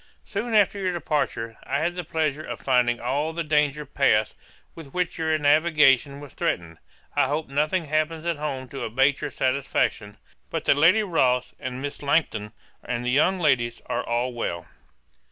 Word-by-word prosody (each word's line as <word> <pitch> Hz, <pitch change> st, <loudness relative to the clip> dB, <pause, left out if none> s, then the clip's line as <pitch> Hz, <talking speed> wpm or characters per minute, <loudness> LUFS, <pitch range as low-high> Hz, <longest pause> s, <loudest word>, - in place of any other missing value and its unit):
'Soon 220 Hz, +3 st, -3 dB
after 205 Hz, -1 st, +3 dB
your 185 Hz, -2 st, 0 dB
departure, 140 Hz, -9 st, -2 dB
I 140 Hz, -, -2 dB
had 170 Hz, +4 st, 0 dB
the 180 Hz, 0 st, -5 dB
pleasure 155 Hz, -2 st, -1 dB
of -, -, -6 dB
finding 125 Hz, -2 st, +2 dB
all 145 Hz, +6 st, -1 dB
the 170 Hz, +1 st, -2 dB
danger 150 Hz, -1 st, +1 dB
past 130 Hz, -6 st, +2 dB, 0.4 s
with 160 Hz, -3 st, -12 dB
which 180 Hz, -2 st, -1 dB
your 160 Hz, -1 st, +1 dB
navigation 145 Hz, -2 st, +3 dB
was 145 Hz, -2 st, -11 dB
threatened. 85 Hz, -2 st, -3 dB, 0.4 s
I -, -, +3 dB
hope 150 Hz, +3 st, -2 dB
nothing 155 Hz, +5 st, 0 dB
happens 155 Hz, +2 st, -1 dB
at 170 Hz, -2 st, 0 dB
home 135 Hz, -3 st, -4 dB
to 135 Hz, -, -7 dB
abate 135 Hz, +5 st, +1 dB
your -, -, -2 dB
satisfaction; 130 Hz, -5 st, -1 dB, 0.3 s
but -, -, -3 dB
that -, -, +5 dB
Lady 175 Hz, +9 st, +5 dB
Rothes, 125 Hz, -9 st, +1 dB
and 130 Hz, +2 st, -5 dB
Mrs. 145 Hz, -, -6 dB
Langton, 140 Hz, -8 st, 0 dB, 0.3 s
and 120 Hz, 0 st, -3 dB
the 125 Hz, -, +1 dB
young 155 Hz, +8 st, +3 dB
ladies, 120 Hz, -7 st, +1 dB
are 120 Hz, -, -2 dB
all 120 Hz, +2 st, -1 dB
well. 85 Hz, -8 st, -3 dB
145 Hz, 170 wpm, -25 LUFS, 125-160 Hz, 0.4 s, that